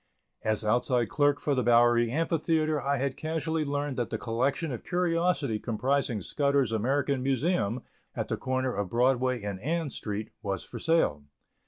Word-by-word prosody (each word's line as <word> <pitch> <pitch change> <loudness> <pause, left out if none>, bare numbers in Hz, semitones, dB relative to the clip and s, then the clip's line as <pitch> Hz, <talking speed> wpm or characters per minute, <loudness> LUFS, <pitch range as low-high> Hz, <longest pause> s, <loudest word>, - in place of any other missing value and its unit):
As 110 0 0
outside 120 +1 +2
clerk 145 -1 +2
for 145 - 0
the 130 - +1
Bowery 120 -1 +4
Amphitheatre 155 +1 +1
I 140 +2 0
had 135 0 -1
casually 160 0 -2
learned 145 -1 -2
that 120 -2 -1
the - - -2
collection 130 +7 -1
of 120 - -5
curiosities 170 -9 0
comprising 120 0 0
Scudder's 140 - +1
American 135 +4 0
Museum, 130 - 0 0.3
at - - -2
the - - -1
corner 130 -1 -1
of 100 -2 -2
Broadway 125 0 +2
and 100 -2 -4
Ann 160 - -1
Street, 105 -1 -5
was 95 -2 -3
for - - -8
sale. 160 - +1
130 Hz, 160 wpm, -28 LUFS, 115-150 Hz, 0.3 s, Bowery